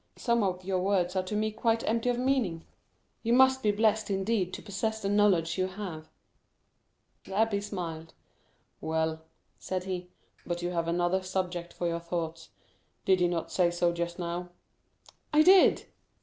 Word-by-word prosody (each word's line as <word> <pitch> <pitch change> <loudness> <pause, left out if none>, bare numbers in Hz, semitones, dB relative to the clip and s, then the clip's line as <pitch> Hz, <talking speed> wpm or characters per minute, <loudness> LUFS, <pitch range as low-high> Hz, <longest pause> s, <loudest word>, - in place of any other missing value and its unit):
Some 235 -1 +1
of 185 -2 -1
your 185 0 0
words 185 -1 +1
are 185 - +2
to 185 +3 -5
me 215 +1 0
quite 225 +1 0
empty 230 +2 +1
of 245 - +1
meaning. 245 -11 0 0.6
You 230 +1 +1
must 260 +1 +5
be 215 - +2
blessed 215 +1 +1
indeed 195 -1 0
to - - -8
possess 220 +2 -2
the 200 -2 -2
knowledge 190 -5 +3
you 185 - +2
have." 185 -5 -7 1.2
The 190 - -9
abbé 210 0 +2
smiled. 165 -6 -6 0.7
"Well," 160 0 -1 0.4
said 185 -1 -3
he, 180 -1 -5 0.3
"but 175 0 -4
you 175 - -1
had 170 -1 -1
another 175 +2 +1
subject 180 -2 -3
for 175 - -5
your 170 0 -1
thoughts; 165 -1 -4 0.6
did 190 -1 +3
you 175 - +4
not 175 -2 -3
say 180 -2 +3
so 175 0 +1
just 170 0 -3
now?" 175 0 -4 0.8
"I 300 +1 +6
did!" 375 +2 +6
185 Hz, 165 wpm, -29 LUFS, 175-215 Hz, 1.2 s, I